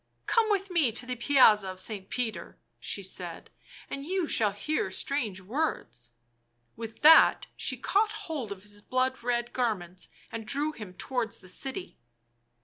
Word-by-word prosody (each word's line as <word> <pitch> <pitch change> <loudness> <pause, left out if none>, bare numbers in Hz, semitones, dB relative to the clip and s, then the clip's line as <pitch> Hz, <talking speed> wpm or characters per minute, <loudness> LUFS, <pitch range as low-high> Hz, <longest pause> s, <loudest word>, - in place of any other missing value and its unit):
" - - -45
Come 455 -2 +3
with 395 -2 0
me 315 -9 +3
to 245 - +2
the 250 0 -3
Piazza 230 -6 +5
of 185 0 -7
St. 200 -2 -3
Peter," 240 -3 -3 0.2
she - - -3
said, - - -6 0.2
" - - -18
and 275 - -5
you 365 +3 -1
shall 215 -6 +4
hear 310 - -2
strange 235 -9 -2
words." 200 - -3 0.7
With 225 +2 -8
that 320 +2 +8
she - - -2
caught 425 +2 +2 0.2
hold 280 -10 -4
of 195 -1 -7
his 205 0 -9
blood 255 +3 0
red 240 0 -1
garments 185 -8 -2 0.2
and 225 -1 -6
drew 290 +3 0
him 210 -10 -10
towards 245 +1 -2
the 185 - -15
city. 270 - -6
245 Hz, 165 wpm, -29 LUFS, 205-295 Hz, 0.7 s, that